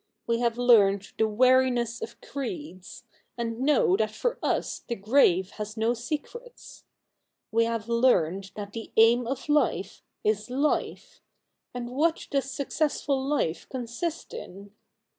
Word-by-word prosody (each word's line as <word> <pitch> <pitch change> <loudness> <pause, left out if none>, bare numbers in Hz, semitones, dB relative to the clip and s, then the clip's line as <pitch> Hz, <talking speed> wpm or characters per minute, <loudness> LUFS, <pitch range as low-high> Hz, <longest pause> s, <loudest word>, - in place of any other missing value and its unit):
We 230 0 0
have 235 -1 0
learned 205 -5 +4
the 220 - +4
weariness 245 +1 +2
of - - -7
creeds; 275 - -7 0.3
and 230 -1 -3
know 265 -9 +3
that 215 0 +1
for 475 - -2
us - - -1
the 235 - -2
grave 195 -4 +3
has 210 +1 -7
no 225 +2 +2
secrets. 310 - -7 0.7
We 230 +1 +3
have 230 -1 -3
learned 195 -6 +2
that 205 -1 -7
the 225 -1 -7
aim 230 +2 +5
of 270 +1 -3
Hfe 285 -10 0 0.2
is 210 +1 0
life; 280 +4 -2 0.5
and 245 -1 -5
what 315 +5 +1
does 275 -2 0
successful 280 0 -1
life 270 - -1
consist 260 +7 -5
in 200 +2 -9
235 Hz, 135 wpm, -27 LUFS, 215-270 Hz, 0.7 s, aim